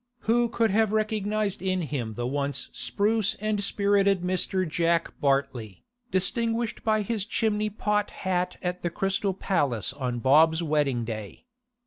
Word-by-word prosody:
Who 235 +1 +2
could 225 -2 +1
have 220 +1 +2
recognised 215 -2 -1
in 185 -1 0
him 125 -7 -4
the 120 - -3
once 140 +1 -2
spruce 215 0 0
and 215 -1 -1
spirited 200 -2 +2
Mr. 185 0 0
Jack 170 +1 +1
Bartley, 135 - -1 0.3
distinguished 230 +3 -1
by 215 -1 +2
his 215 -1 -1
chimney 215 -1 0
pot 210 0 0
hat 180 -1 -2
at 180 0 -2
the 175 - -1
Crystal 195 +2 -1
Palace 135 - 0
on 130 -3 -3
Bob's 160 +7 +4
wedding 145 -6 +1
day? 110 - -7
185 Hz, 140 wpm, -26 LUFS, 145-210 Hz, 0.3 s, Bob's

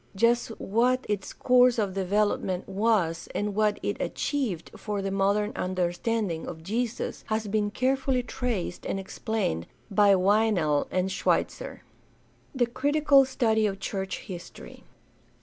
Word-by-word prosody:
Just 235 +4 +3
what 250 +5 +1
its 205 -2 -2
course 250 -1 +4
of 205 -4 0
development 195 -1 0
was 195 -5 0
and 205 0 -1
what 210 0 +1
it - - -1
achieved 245 - -2
for 210 -2 -4
the 195 0 -2
modern 200 +2 +1
understanding 185 0 -1
of 160 -2 -7
Jesus 230 +5 -3
has 215 0 -1
been 205 0 0
carefully 260 +2 0
traced 230 -7 -3
and 195 - -2
explained 195 - -2 0.2
by 200 -1 +5
Weinel 190 -6 +2
and 185 +1 0
Schweitzer. - - -1 0.7
The 250 -2 +3
critical 280 +2 +3
study 220 -5 +1
of 195 -1 -4
church 190 -1 -4
history. 180 -4 -10
210 Hz, 130 wpm, -27 LUFS, 190-235 Hz, 0.7 s, by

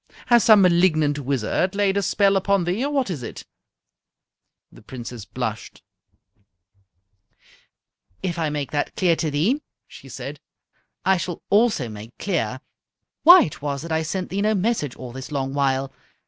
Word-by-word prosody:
Has 240 -2 +5
some 215 -3 +7
malignant 165 -5 +3
wizard 140 - -1
laid 200 -1 +1
a 200 - +1
spell 200 0 +2
upon 195 0 +2
thee, 180 +8 -1
or 285 - -1
what 270 -8 0
is 150 -7 -5
it?" 115 - -8 1.3
The - - -16
Princess 120 -1 -8
blushed. - - -6 2.4
"If 175 -2 -2
I 160 -2 0
make 145 -2 -4
that 145 -1 -2
clear 175 -3 +2
to 160 - -1
thee," 185 - +1 0.3
she - - -14
said, - - -7 0.7
"I 190 0 +4
shall 175 0 -5
also 210 - +3
make 110 +2 -10
clear 130 - -2 0.6
why 355 +3 +9
it 150 - -6
was 140 0 -3
that 165 - -7
I 160 0 +1
sent 180 +3 -4
thee 195 +2 -1
no 215 +1 +2
message 190 - -1
all 125 -1 -9
this 130 +3 -9
long 135 -2 -2
while. 135 -1 0
165 Hz, 160 wpm, -23 LUFS, 140-200 Hz, 2.4 s, why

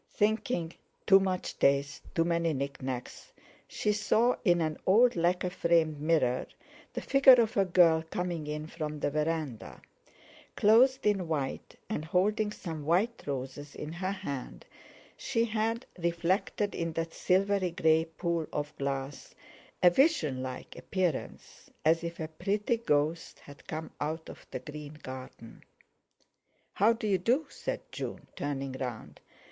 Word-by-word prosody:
Thinking, 210 -5 0 0.3
'Too 195 0 +7
much 185 -2 -2
taste—too 140 +4 +1
many 170 -1 +1
knick 140 0 -4
knacks,' 130 -1 -6 0.4
she 210 - 0
saw 230 +3 +2
in 175 -5 +4
an 155 -2 -1
old 230 +6 +5
lacquer 180 +1 +1
framed 165 -4 +2
mirror 150 -6 +1 0.5
the - - -3
figure 275 -1 +7
of 230 -1 +1
a 195 - +3
girl 170 -3 +5
coming 175 -4 -3
in 150 0 -4
from 155 -2 -5
the 145 - 0
verandah. 155 -5 -2 0.8
Clothed 245 +5 +5
in 195 -4 +2
white, 145 -4 -3
and 150 - -3
holding 210 +6 +1
some 160 -7 -6
white 190 +10 +1
roses 140 +1 -5
in 150 +2 -6
her 185 +2 -2
hand, 140 -9 -6 0.5
she 230 -2 0
had, 225 +2 -1
reflected 175 +4 0
in 165 -1 -3
that 165 0 -3
silvery 195 0 +2
grey 160 -1 +3
pool 165 0 -2
of 150 0 -4
glass, 135 0 -4 0.5
a 180 - +8
vision 175 - +2
like 130 -1 -7
appearance, 180 -6 -3 0.2
as 165 +2 +4
if 170 0 -5
a 160 - -3
pretty 205 +8 -1
ghost 160 -6 0
had 145 0 -15
come 160 0 -5
out 160 +2 -3
of - - -15
the - - -4
green 150 +3 -9
garden. 130 -3 -9 1.1
"How 210 +4 +4
do 230 0 -3
you 195 -3 +2
do?" 250 - +2
said - - -4
June, - - -6
turning 140 -1 -3
round. 125 -4 -6
165 Hz, 140 wpm, -30 LUFS, 150-195 Hz, 1.1 s, a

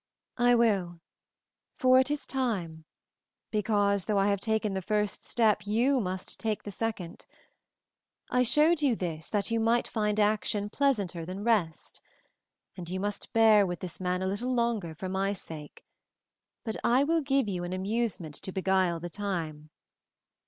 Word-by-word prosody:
"I 245 0 +5
will, 195 -7 +1 0.8
for 255 0 +5
it 260 - +2
is 295 0 -2
tune, 185 -12 -2 0.7
because 205 -2 +1
though 210 +1 0
I 195 +1 +3
have 200 -1 +1
taken 220 -1 0
the 190 - -2
first 210 +1 -1
step 210 -3 +1
you 245 +6 +2
must 185 -3 -4
take 220 -2 -2
the 205 - -6
second. 200 -5 -5 1.0
I 250 0 +2
showed 300 +6 +4
you 270 -5 +3
this 160 -5 -4
that 210 +1 -1
you 230 - +1
might 230 +2 +2
find 210 -1 -1
action 210 -1 +1
pleasanter 205 -13 0
than 185 +4 -6
rest, 205 -9 -1 0.7
and 175 -2 -8
you 185 +1 -3
must 205 +1 -4
bear 220 -2 +6
with 175 -1 -4
this 180 -3 -7
man 180 0 -1
a - - 0
little 215 +7 -2
longer 225 -9 -1
for 185 +4 -5
my 195 +2 0
sake, 155 -6 -10 0.8
but 220 -2 -3
I 250 +3 +4
will 325 +2 +2
give 275 -4 +1
you 180 -3 -3
an 175 - -4
amusement 190 -4 -2
to 190 - -5
beguile 190 -2 +1
the 175 - -5
time. 165 -6 -4
205 Hz, 160 wpm, -29 LUFS, 185-230 Hz, 1.0 s, bear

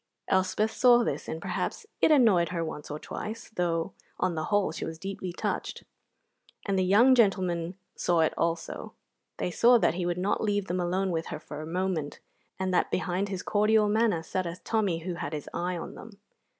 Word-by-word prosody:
Elspeth 190 +3 +1
saw 240 0 +5
this, - - -3
and 160 - -4
perhaps 430 - -3 0.2
it - - +5
annoyed 220 - +5
her 170 -2 -2
once 150 -2 -7
or 150 - -4
twice, 220 +8 -6
though 175 -3 -1 0.3
on 185 -1 +1
the 155 -1 -2
whole 205 -5 +1
she - - -5
was 160 0 -5
deeply 190 +1 -5
touched; 175 - -3 0.8
and 200 - 0
the - - +3
young 215 +8 +6
gentlemen 185 -6 +2 0.2
saw 175 -2 +2
it 160 - +2
also: 165 0 -2 0.4
they 180 - -2
saw 240 +7 +6
that 225 - +2
he 175 0 -2
would 175 0 -1
not 195 +5 0
leave 205 -2 +1
them 180 0 -2
alone 185 +2 0
with 165 -1 -2
her 150 - -5
for 150 -1 -8
a 155 - -7
moment, 175 -4 -2 0.4
and 185 -1 -1
that 180 - +2
behind 185 +2 -1
his 190 -2 -4
cordial 210 +1 +3
manner 210 -5 +2
sat 185 +2 -2
a 170 - -4
Tommy 195 -7 0
who 180 - -2
had 170 - -5
his 150 -2 -5
eye 180 +1 -2
on 165 - -6
them. 210 -2 -12
185 Hz, 200 wpm, -28 LUFS, 170-205 Hz, 0.8 s, young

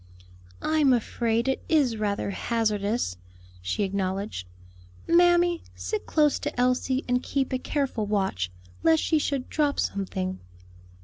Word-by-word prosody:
"I'm 305 -4 +4
afraid 235 0 0
it 265 - 0
is 285 -8 +3
rather 205 -2 -1
hazardous," 215 - -1 0.4
she 90 - -1
acknowledged. 195 - -2 0.6
"Mammy, 345 0 +4
sit 430 -1 -4
close 300 -2 +3
to - - -4
Elsie 255 +2 +1
and 250 0 +2
keep 270 -1 -1
a 255 - 0
careful 260 -7 -1
watch, 190 - 0 0.3
lest 160 +6 +4
she 315 - +2
should 280 -3 -1
drop 295 -2 0
something." 190 -1 -2
240 Hz, 125 wpm, -26 LUFS, 200-285 Hz, 0.6 s, I'm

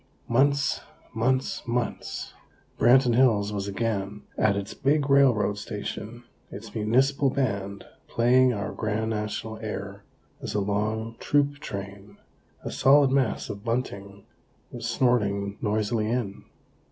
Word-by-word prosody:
Months, 140 +4 +2 0.3
months, 130 +4 0
months! 120 0 -3 0.5
Branton 125 +1 +5
Hills 110 -5 +3
was 100 -1 -3
again 105 -1 -3
at 100 -2 +2
its 100 +1 -4
big 140 +1 +1
railroad 120 -7 +4
station, 110 +3 -6 0.3
its 105 +2 -9
Municipal 130 +6 +2
Band 100 -7 -2 0.2
playing 125 +2 +4
our 105 -2 -3
grand 110 0 -2
National 110 +1 -4
air, 100 -2 -6 0.4
as 105 - -5
a - - +2
long 110 +3 -2
troop 145 -1 +1
train, 100 -2 -8 0.5
a - - -4
solid 140 0 +5
mass 135 -5 +1
of 100 0 -7
bunting, 100 -5 -3 0.5
was - - -5
snorting 100 -5 +1
noisily 110 0 0
in. 115 -5 -3
110 Hz, 120 wpm, -26 LUFS, 100-125 Hz, 0.5 s, Branton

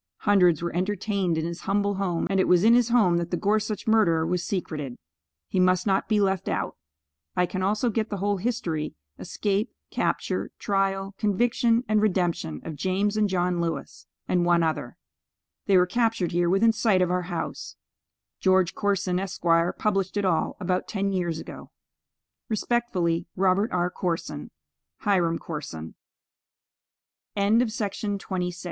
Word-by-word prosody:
Hundreds 180 -6 +4
were 170 - -3
entertained 195 -2 0
in 160 - -1
his 170 +1 -5
humble 200 +1 0
home, 190 -4 -1
and 195 - +2
it - - +3
was 180 0 +4
in 225 +2 +6
his 245 -1 +4
home 210 -8 +4
that 170 0 -2
the 175 - -1
Gorsuch 210 +1 0
murderer 190 -8 +3
was 180 0 -1
secreted. 155 -9 -4 0.5
He 185 - -1
must 185 -1 +3
not 195 -2 +1
be 215 -1 +3
left 195 -2 0
out. - - -2 0.6
I 180 - +3
can 185 +2 -4
also 210 +5 +1
get 220 0 -1
the 205 - -3
whole 200 +1 0
history, 180 -8 -2 0.2
escape, 205 +4 -1 0.2
capture, - - -1
trial, 195 -1 -1
conviction 230 +3 +2
and 215 -1 +2
redemption 175 - 0
of 160 - -5
James 195 +5 0
and 210 -1 +2
John 180 -1 0
Lewis, 165 -1 -4 0.2
and 175 -1 +2
one 175 -1 +3
other. 160 -1 -2 0.7
They 195 -2 +5
were 180 - +5
captured 225 -2 0
here 175 0 +1
within 215 +5 +4
sight 215 -4 +2
of 180 - 0
our 180 0 -1
house. 170 -2 -5 0.6
George 185 -2 +3
Corson, 195 -3 0
Esq., 195 0 -6 0.3
published 195 -2 0
it 205 - 0
all, 170 -4 0
about 185 -1 -1
ten 200 -1 -1
years 175 -4 -1
ago. - - -9 0.8
Respectfully, 195 -7 0
ROBERT 190 +3 +2
R. 180 0 0
CORSON. 175 -2 -3 0.5
HIRAM 175 -5 +2
CORSON. 80 - -7 1.4
CHARLES 200 +3 +3
D. 245 - +3
CLEVELAND. 205 -2 -3
Mr. 180 -2 -3
190 Hz, 155 wpm, -26 LUFS, 175-205 Hz, 1.4 s, in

